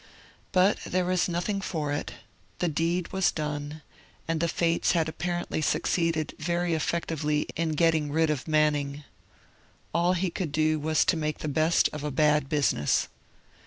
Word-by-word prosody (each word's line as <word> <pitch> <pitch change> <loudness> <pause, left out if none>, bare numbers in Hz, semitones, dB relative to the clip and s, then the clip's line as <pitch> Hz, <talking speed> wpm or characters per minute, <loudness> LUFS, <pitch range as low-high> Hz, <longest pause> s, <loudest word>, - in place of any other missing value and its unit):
But 185 +2 +3
there 185 0 0
was 180 0 +1
nothing 180 +4 -1
for 155 -6 -2
it; 145 - -3 0.4
the 180 - 0
deed 165 +3 -1
was 190 -1 +2
done; 150 0 -4 0.4
and 165 -1 0
the 170 - +1
Fates 170 +1 +1
had 165 -3 +1
apparently 175 0 -3
succeeded 165 0 0
very 170 +2 0
effectively 155 -2 -1
in 165 -1 -1
getting 155 -2 +2
rid 160 +1 +2
of 145 -2 -3
Manning. 150 -2 +1 0.9
All 175 +2 +3
he 180 0 -1
could 165 -3 -3
do 155 +1 +1
was 155 +1 +2
to 185 - +3
make 155 -1 -2
the - - -5
best 155 +3 +3
of 150 -1 -5
a 150 - -1
bad 150 0 +2
business. 145 - +1
160 Hz, 160 wpm, -27 LUFS, 150-170 Hz, 0.9 s, But